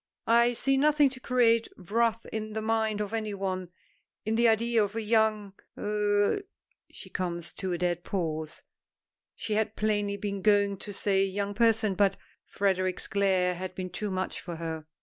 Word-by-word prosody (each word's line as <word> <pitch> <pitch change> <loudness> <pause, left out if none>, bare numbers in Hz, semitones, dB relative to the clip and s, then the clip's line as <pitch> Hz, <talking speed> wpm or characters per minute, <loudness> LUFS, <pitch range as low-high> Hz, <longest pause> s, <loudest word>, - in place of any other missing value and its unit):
"I 235 +1 +4
see 270 +3 +1
nothing 295 0 +4
to 255 0 -9
create 235 -3 +3
wrath 225 +4 0
in 215 -1 -4
the 220 - -2
mind 220 -1 0
of 210 +1 -4
any 215 -2 -2
one, 185 -2 -3 0.6
in 220 - 0
the 235 +1 +4
idea 230 0 +3
of 205 +1 -4
a 225 - -1
young 215 -2 +1 0.2
er 210 - +1 0.2
" - - -36
She - - -12
comes 175 -2 -4
to 190 -2 -4
a 175 - 0
dead 175 0 -1
pause; 160 -5 -3 0.7
she 215 - -3
had 220 0 0
plainly 205 -1 0
been 200 -1 -4
going 205 -1 +3
to 205 - -8
say 195 -1 +1
young 200 +1 -2
person 225 -1 +3
but 195 0 +2 0.3
Frederic's 185 -2 0
glare 190 -2 +2
had 185 +1 -6
been 185 -1 -5
too 210 +4 -3
much 185 0 -3
for 175 -2 -6
her. 160 -1 -5
205 Hz, 175 wpm, -28 LUFS, 185-220 Hz, 0.7 s, I